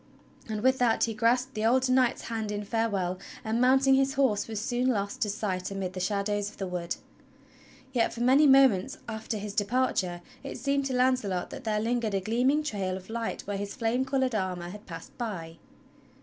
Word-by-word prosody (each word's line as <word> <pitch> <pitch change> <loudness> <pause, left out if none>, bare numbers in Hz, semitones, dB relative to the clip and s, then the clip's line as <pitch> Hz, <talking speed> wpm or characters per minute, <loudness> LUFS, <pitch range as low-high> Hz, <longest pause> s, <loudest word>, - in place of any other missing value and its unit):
And 215 -1 -2
with 260 0 +3
that 235 -2 +3
he 225 - +1
grasped 245 +4 +1
the 215 - -3
older 255 +3 +3
knight's 255 -1 +2
hand 220 -2 -3
in 205 0 -3
farewell, 200 -4 -1 0.3
and 225 +2 0
mounting 265 +1 +5
his 270 0 +2
horse 260 -7 +2
was 220 -2 -4
soon 245 +3 0
lost 200 -5 -1
to 210 - +1
sight 190 -3 -2
amid 195 -2 -4
the 185 - -5
shadows 205 +1 -1
of - - -17
the 195 - -3
wood. 175 -2 -3 1.0
Yet 240 -3 +2
for 235 - -6
many 270 +5 +5
moments 270 -2 +5
after 220 0 -4
his 205 0 -5
departure 200 -5 0 0.2
it - - -6
seemed 280 0 0
to 260 - -2
Launcelot 250 -8 +1
that - - -8
there 215 -1 +1
lingered 230 -2 0
a - - +2
gleaming 250 +9 +1
trail 195 -8 -2
of 190 +3 -11
light 230 0 -3
where 205 0 -3
his 200 0 -5
flame 245 +1 0
colored 265 -1 0
armor 185 -4 -2
had 210 +4 -11
passed 165 -3 -9
by. 170 -8 -5
220 Hz, 195 wpm, -28 LUFS, 200-255 Hz, 1.0 s, mounting